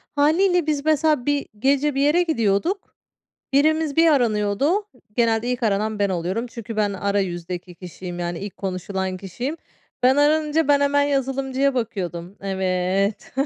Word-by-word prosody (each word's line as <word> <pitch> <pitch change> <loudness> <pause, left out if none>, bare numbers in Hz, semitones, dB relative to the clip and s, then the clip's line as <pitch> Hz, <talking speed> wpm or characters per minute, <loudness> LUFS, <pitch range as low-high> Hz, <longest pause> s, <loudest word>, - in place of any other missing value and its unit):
Hâliyle 335 +3 +3
biz, 290 -1 -1
mesela, 310 -4 +2
bir 290 -1 0
gece 280 +2 +2
bir 275 - +1
yere 310 +5 +4
gidiyorduk, 310 - -1 0.6
birimiz 310 +1 +2
bir 330 0 +5
aranıyordu, 245 - +1 0.3
genelde 230 -1 +2
ilk 250 0 -3
aranan 215 0 0
ben 200 -1 +2
oluyorum. 185 +7 -2
Çünkü 230 -1 -8
ben 205 -2 +1
ara 200 +1 0
yüzdeki 175 -1 -4
kişiyim, 180 0 -8
yani, 175 -1 -3
ilk 200 0 -7
konuşulan 190 0 -3
kişiyim. 240 - -5 0.5
Ben 260 +2 +5
aranınca, 300 +1 +2
ben 285 -1 +5
hemen 285 0 +3
yazılımcıya 270 -1 0
bakıyordum. 190 -6 -4
Evet, 190 +1 -1
235 Hz, 145 wpm, -22 LUFS, 195-290 Hz, 0.6 s, bir